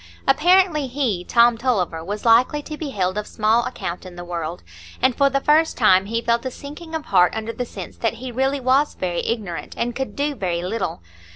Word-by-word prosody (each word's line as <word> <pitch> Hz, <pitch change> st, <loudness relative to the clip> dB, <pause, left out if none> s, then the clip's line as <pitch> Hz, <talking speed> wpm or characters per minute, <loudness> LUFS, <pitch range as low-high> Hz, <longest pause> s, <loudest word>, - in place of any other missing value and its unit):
Apparently 310 Hz, +1 st, +4 dB
he, 245 Hz, -9 st, -1 dB
Tom 235 Hz, +3 st, +4 dB
Tulliver, 185 Hz, -10 st, 0 dB
was 205 Hz, +5 st, -5 dB
likely 250 Hz, +6 st, +4 dB
to 305 Hz, -, -6 dB
be 300 Hz, -1 st, -5 dB
held 190 Hz, -4 st, -1 dB
of 210 Hz, -, -6 dB
small 220 Hz, +2 st, +2 dB
account 170 Hz, +1 st, -5 dB
in 185 Hz, -2 st, -11 dB
the 175 Hz, 0 st, -8 dB
world; 170 Hz, -1 st, -5 dB, 0.4 s
and 260 Hz, -2 st, +2 dB
for 280 Hz, -1 st, +4 dB
the 275 Hz, 0 st, +1 dB
first 310 Hz, +3 st, +3 dB
time 190 Hz, -4 st, +4 dB
he 230 Hz, +2 st, -2 dB
felt 235 Hz, 0 st, +1 dB
a 260 Hz, -, -2 dB
sinking 300 Hz, +5 st, -9 dB
of 315 Hz, -, -4 dB
heart 180 Hz, -2 st, +3 dB
under 220 Hz, +1 st, -4 dB
the 245 Hz, +2 st, -3 dB
sense -, -, -9 dB
that 230 Hz, 0 st, -1 dB
he 250 Hz, +2 st, -7 dB
really 265 Hz, +3 st, 0 dB
was 265 Hz, +3 st, +2 dB
very 175 Hz, -2 st, -2 dB
ignorant, 190 Hz, -10 st, -4 dB
and 240 Hz, 0 st, -2 dB
could 265 Hz, 0 st, -4 dB
do 290 Hz, +1 st, -1 dB
very 175 Hz, -8 st, -2 dB
little. 185 Hz, -, -3 dB
235 Hz, 210 wpm, -22 LUFS, 190-275 Hz, 0.4 s, Apparently